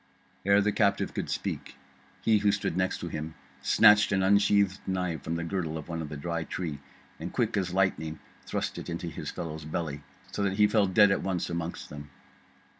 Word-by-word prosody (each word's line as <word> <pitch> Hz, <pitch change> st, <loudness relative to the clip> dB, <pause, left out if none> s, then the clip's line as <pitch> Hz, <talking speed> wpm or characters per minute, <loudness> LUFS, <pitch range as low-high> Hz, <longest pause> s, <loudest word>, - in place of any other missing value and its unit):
Ere 100 Hz, +1 st, +6 dB
the 105 Hz, +1 st, +2 dB
captive 100 Hz, -1 st, +1 dB
could -, -, -3 dB
speak, -, -, -4 dB, 0.5 s
he 110 Hz, -2 st, +4 dB
who 100 Hz, 0 st, +3 dB
stood 100 Hz, -4 st, -1 dB
next 95 Hz, -1 st, -1 dB
him 80 Hz, -2 st, -5 dB, 0.3 s
snatched 105 Hz, +8 st, +6 dB
an 95 Hz, -1 st, +2 dB
unsheathed 100 Hz, 0 st, +3 dB
knife 90 Hz, -5 st, -1 dB
from 80 Hz, +3 st, -2 dB
the 85 Hz, -, -2 dB
girdle 85 Hz, -2 st, -2 dB
of 80 Hz, -, -8 dB
one 85 Hz, -1 st, -4 dB
of 75 Hz, -, -5 dB
the 75 Hz, -, -6 dB
Dry 85 Hz, +3 st, -2 dB
Tree, 80 Hz, -4 st, -4 dB, 0.4 s
and 85 Hz, +3 st, -5 dB
quick 115 Hz, -3 st, 0 dB
as 95 Hz, -3 st, 0 dB
lightning 85 Hz, -4 st, 0 dB, 0.3 s
thrust -, -, -2 dB
it -, -, -7 dB
into 85 Hz, +1 st, -4 dB
his -, -, -6 dB
fellow's 80 Hz, -1 st, -5 dB
belly, 75 Hz, -2 st, -3 dB, 0.3 s
so -, -, -3 dB
that 100 Hz, -1 st, +1 dB
he 105 Hz, +2 st, +5 dB
fell 105 Hz, -1 st, +3 dB
dead 100 Hz, +1 st, +5 dB
at 95 Hz, -, +1 dB
once 90 Hz, -3 st, -2 dB
amongst 85 Hz, 0 st, -4 dB
them. 75 Hz, 0 st, -8 dB
90 Hz, 195 wpm, -28 LUFS, 80-100 Hz, 0.5 s, Ere